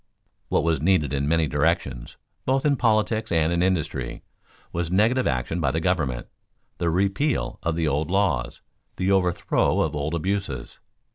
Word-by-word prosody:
What - - +2
was 80 -4 +1
needed 75 -5 +2
in 70 0 0
many 80 +1 +3
directions, 70 -4 -1 0.3
both 135 +2 +1
in 145 -1 +4
politics 110 -2 +1
and 80 0 +2
in 85 - +1
industry, 85 -9 -1 0.5
was 85 -1 -2
negative 110 +8 +2
action 65 +7 -1
by 70 - +2
the 80 - -1
government, 80 -8 -1 0.5
the 85 - +1
repeal 100 - 0
of 85 -1 -1
the 80 -1 0
old 75 +2 0
laws, 85 -11 0 0.3
the 95 +1 0
overthrow 90 -3 +2
of - - -1
old 75 +3 -2
abuses. 85 -8 -3
85 Hz, 155 wpm, -24 LUFS, 75-95 Hz, 0.5 s, in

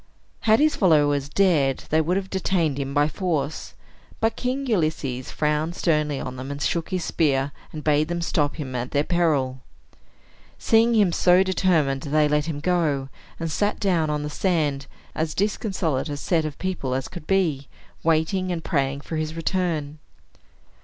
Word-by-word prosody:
Had 220 0 +4
his 305 0 +3
followers 145 -6 +3
dared, 150 -7 +2
they 160 +1 +4
would 175 +4 0
have 195 -1 -4
detained 170 -6 0
him 135 -1 -3
by 145 +1 +3
force. 155 -3 -3 0.4
But 225 0 +1
King 260 +2 -2
Ulysses 155 - -1
frowned 150 +3 -1
sternly 150 -5 +1
on 130 0 -6
them, 130 +2 -6
and 140 0 -5
shook 165 +2 -1
his 185 -3 -2
spear, 140 -3 +1 0.2
and 155 -1 -7
bade 150 0 +2
them 170 0 -2
stop 145 -3 0
him 135 -5 -6
at 125 +1 -3
their 145 0 +1
peril. 150 -7 +1 1.0
Seeing 230 +1 +3
him 205 -5 +4
so 180 +2 +4
determined, 165 -8 +1
they 150 +2 +2
let 150 +1 +1
him 145 -3 -4
go, 150 -6 0 0.3
and 165 -1 -3
sat 205 +6 0
down 175 -6 +1
on 150 -1 -1
the 150 - -3
sand, 150 -6 0 0.3
as 160 0 -2
disconsolate 185 - -1
a 145 - -4
set 160 +1 0
of 150 -2 -5
people 175 -9 -2
as 135 0 -2
could 175 -4 -10
be, 160 -8 +1 0.3
waiting 165 +3 +1
and 165 -2 -3
praying 140 -2 -1
for 160 - -5
his 155 0 -3
return. 165 -4 -2
155 Hz, 170 wpm, -24 LUFS, 145-180 Hz, 1.0 s, Had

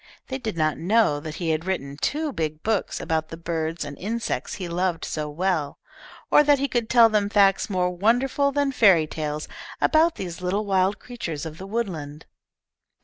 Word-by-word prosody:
They 265 0 -3
did 220 -8 -4
not 155 -1 +1
know 190 -5 +2
that 155 +1 -7
he 165 -2 -1
had 160 +2 -1
written 140 -7 -3
two 295 - -2
big 155 -3 -3
books 220 -3 -1
about 160 -1 -1
the 165 - -7
birds 165 -1 -3
and 145 0 -7
insects 225 +4 -3
he 185 -3 -5
loved 175 -1 -1
so 150 -1 -3
well, 160 -2 -1 0.5
or - - +7
that 290 -1 +4
he 280 +1 0
could 240 -4 -1
tell 235 -2 +7
them 210 -2 +1
facts 200 -1 +3
more 180 -2 0
wonderful 245 +9 +2
than 285 0 +1
fairy 195 -11 +5
tales 150 -1 -4 0.3
about 320 +1 +3
these 180 -2 -6
little 195 +4 -1
wild 190 0 +2
creatures 170 -12 -6
of 160 0 -8
the 190 - -7
woodland. 165 -9 -4
185 Hz, 185 wpm, -24 LUFS, 160-225 Hz, 0.5 s, or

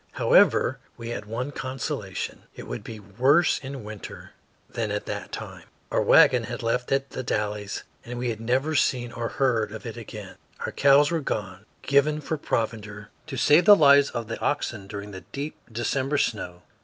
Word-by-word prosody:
However, - - +4 0.2
we 115 0 -7
had 105 -3 -5
one 120 +6 -4
consolation, 130 -3 -5
it - - -8
would - - -6
be 110 -1 -8
worse 130 - +3
in 135 -3 -7
winter 105 -1 -9 0.4
than 115 -2 -3
at 105 0 -3
that - - -5
time. - - -8 0.3
Our - - +2
wagon - - +6
had - - -5
been - - -6
left 125 +1 -1
at 135 0 0
The - - -4
Dalles 105 -3 -3 0.2
and 120 +1 -7
we 120 0 -1
had 110 0 -7
never 130 +7 0
seen 125 -4 +1
or 115 -1 -3
heard 115 -6 +1
of 110 +2 -8
it 115 0 -6
again. 105 -3 -9 0.3
Our - - -3
cows 140 +2 +5
were 165 - +1
gone 100 -6 -4 0.2
given 145 +2 +3
for 160 - -3
provender 105 -5 -3 0.2
to 135 -4 -5
save 155 +7 +5
the 205 - +10
lives 140 -4 +6
of 115 -2 -5
the 115 - -5
oxen 115 -8 -2
during 100 0 -7
the 95 -1 -8
deep 145 +2 -6 0.2
December 130 +5 -1
snow. 90 -9 -2
120 Hz, 185 wpm, -25 LUFS, 105-140 Hz, 0.4 s, the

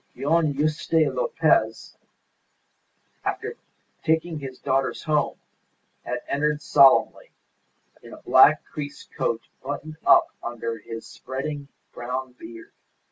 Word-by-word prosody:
Don 155 +2 +2
Juste 155 +2 +1
Lopez, - - +1 1.3
after 445 +1 -3 0.5
taking 160 0 0
his 135 -2 -8
daughters 135 -1 -1
home, 150 -1 0 0.7
had 120 0 -4
entered 150 +1 0
solemnly, 135 -2 +4 0.7
in - - -13
a - - -12
black - - +6
creased 145 -1 -8
coat 115 0 -1 0.2
buttoned 155 0 -6
up - - +6
under 115 -1 -4
his 115 +2 -8
spreading 140 +2 -6 0.3
brown 125 +2 -4
beard. 115 -2 -12
140 Hz, 105 wpm, -24 LUFS, 125-155 Hz, 1.3 s, black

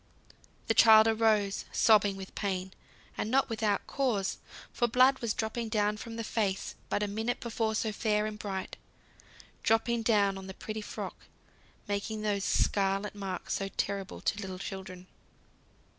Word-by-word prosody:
The - - +2
child 220 -1 +8
arose 220 -3 +2
sobbing 205 -3 +4
with 190 -1 -9
pain; 190 -2 -3 0.5
and 215 - -1
not 265 +3 +2
without 215 -3 0
cause, 230 -9 -1 0.3
for 240 - +1
blood 255 +3 +4
was 230 -3 -1
dropping 225 +1 -2
down 210 -1 +1
from 225 +1 -7
the 230 - -3
face, 205 -3 -1 0.2
but 205 - 0
a - - 0
minute 220 +4 -2
before 225 -2 -1
so 220 0 0
fair 210 0 0
and 215 0 -5
bright 195 -2 -4 0.8
dropping 230 +1 +2
down 205 -4 +2
on 190 - -9
the 190 - -8
pretty 215 0 -5
frock, - - -7 0.6
making 205 +2 -3
those 205 -2 0
scarlet 195 +1 +1
marks 195 -3 -4
so 195 - -1
terrible 195 -1 -2
to 205 - -1
little 190 -2 -5
children. 190 -1 -7
210 Hz, 155 wpm, -30 LUFS, 195-225 Hz, 0.8 s, child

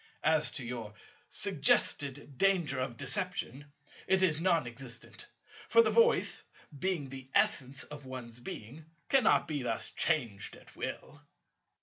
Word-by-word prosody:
As 155 -1 +4
to 130 - -4
your 115 -3 -6 0.3
suggested 140 0 +1
danger 175 -9 +2
of 130 -2 -3
deception, 145 -1 -4 0.4
it 190 0 +3
is 160 -3 +2
non 170 -5 +2
existent: 120 0 -5 0.4
for 465 - +7
the - - +1
Voice, 470 +1 +4 0.4
being 175 -6 -1
the 135 0 -9
essence 135 +1 +2
of 145 -2 -10
one's 125 -2 -7
Being, 120 +5 -8 0.3
cannot 260 -5 +4
be 150 -3 -2
thus 115 -3 -1
changed 120 -12 0
at - - -17
will. - - -6
140 Hz, 130 wpm, -31 LUFS, 125-165 Hz, 0.4 s, for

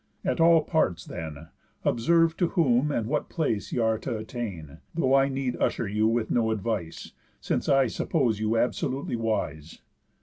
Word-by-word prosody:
At - - 0
all 165 -1 +6
parts, 150 - 0
then, 80 0 -7 0.4
Observe 165 +7 +3
to 175 - +2
whom 150 -6 +2
and 115 -6 -1
what 145 +5 -2
place 130 - -2
y' - - -2
are 110 -2 +1
t' 130 - -6
attain; 110 - -5 0.2
Though 135 -6 +2
I 135 0 +4
need 135 -2 -2
usher 115 - 0
you 105 +2 +1
with 115 0 0
no 115 -2 +2
advice, 105 -6 -3 0.3
Since - - -2
I 135 -1 +5
suppose 120 -3 0
you 110 +1 0
absolutely 130 +2 -1
wise. 100 -9 -3
115 Hz, 165 wpm, -27 LUFS, 105-135 Hz, 0.4 s, all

